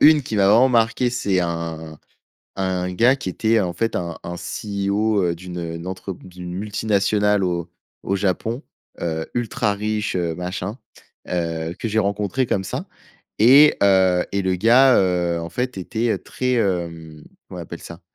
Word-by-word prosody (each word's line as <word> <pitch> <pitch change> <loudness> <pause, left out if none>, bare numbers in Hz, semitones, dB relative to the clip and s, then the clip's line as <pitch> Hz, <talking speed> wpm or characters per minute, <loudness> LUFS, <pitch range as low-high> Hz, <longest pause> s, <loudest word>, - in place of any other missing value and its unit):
1 150 -1 +7
qui 110 - -4
m'a 100 - +4
vraiment 115 +6 +6
marquée, 120 0 +2
c'est 100 -6 0
un 80 -2 -4 0.6
un 90 -1 -1
gars 120 +8 +4
qui 135 - -5
était 110 +5 +1
en 90 -4 -1
fait 115 +6 -1
un 85 -2 -3
un 85 0 -5
CEO, 100 +2 -1
heu, 85 -1 0
d'une, 90 +1 -8
heu, 85 -1 -4
n 85 +2 -7
entre 95 +1 -5
d'une 90 -1 -9
multinationale 105 0 +1
au 85 -2 -2 0.3
au 100 - 0
Japon, 105 - -1 0.4
heu, 80 -1 -2
ultra 110 -3 0
riche, 105 +1 -2
heu, 85 -3 -1
machin, 90 +4 -4 0.5
heu, 85 -1 -2
que 115 - -2
j'ai 110 +1 +1
rencontré 105 +5 0
comme 95 -4 -1
ça - - -4 0.5
et 135 +7 +7
heu 95 -2 +4
et 100 - 0
le 95 -1 0
gars, 125 +7 +5
heu, 90 -2 +1
en 85 0 -5
fait 125 +5 -3
était 110 +5 -1
très, 125 0 -2
hem, 85 -8 -2 0.2
comment - - -8
on - - -5
appelle - - -9
ça? 85 +1 -10
95 Hz, 170 wpm, -21 LUFS, 85-110 Hz, 0.6 s, 1